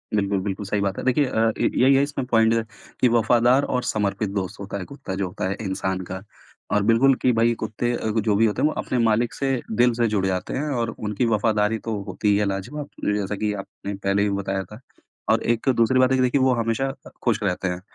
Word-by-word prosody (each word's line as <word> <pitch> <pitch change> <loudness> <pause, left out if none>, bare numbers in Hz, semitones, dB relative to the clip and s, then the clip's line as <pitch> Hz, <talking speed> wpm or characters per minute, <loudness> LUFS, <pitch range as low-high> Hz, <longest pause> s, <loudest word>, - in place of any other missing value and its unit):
बिल्कुल, 100 -1 +1
बिल्कुल, 100 +1 -4
सही 100 +1 -1
बात 100 -1 -1
है। - - -4
देखिए 130 +3 +3
अ, 115 -3 +1
इ - - +3
यही 135 +2 +6
है 135 - +4
इसमें 140 -2 -3
पॉइंट 115 -2 +4 0.5
कि 125 - +6
वफादार 120 +3 +3
और 125 -2 -1
समर्पित 105 -2 -1
दोस्त 95 -2 -4
होता 100 0 -5
है 95 - -5
कुत्ता 135 -7 -7
जो 95 0 -1
होता 90 - -4
है 100 - -2
इंसान 95 -2 -2
का। 95 +1 -6 0.5
और 105 0 +2
बिल्कुल 115 +5 +4
कि 125 - +4
भाई 115 +1 +4
कुत्ते 110 +2 -2
अ, 110 - -2
जो 110 -1 +1
भी 115 +2 +4
होते 105 - 0
हैं - - +4
वो - - -4
अपने 130 - -2
मालिक 115 +1 +2
से 135 -1 -1 0.2
दिल 120 +2 +3
से 120 0 +1
जुड़ 105 -3 0
जाते 95 -1 -2
हैं 150 +3 -2
और 120 -4 -1
उनकी 105 +2 -1
वफादारी 110 -1 +1
तो 115 0 -4
होती 105 - -4
ही 100 - +4
है 105 - +1
लाजवाब। 100 +10 -4 0.2
अ, 105 - +2
जैसा 105 0 -1
कि 105 +1 -1
आपने 100 0 -7
पहले 100 +1 0
भी 105 - +1
बताया 95 -1 -2
था 105 - -10 0.5
और - - +3
एक 120 +3 0
दूसरी 115 +3 +3
बात 130 0 +4
है - - +4
ये - - +2
देखिए 125 +2 +2
कि - - +2
वो 130 - +4
हमेशा 115 +4 -1 0.3
खुश 115 -4 +2
रहते 95 -1 -1
हैं 90 0 -3
110 Hz, 245 wpm, -23 LUFS, 100-120 Hz, 0.5 s, यही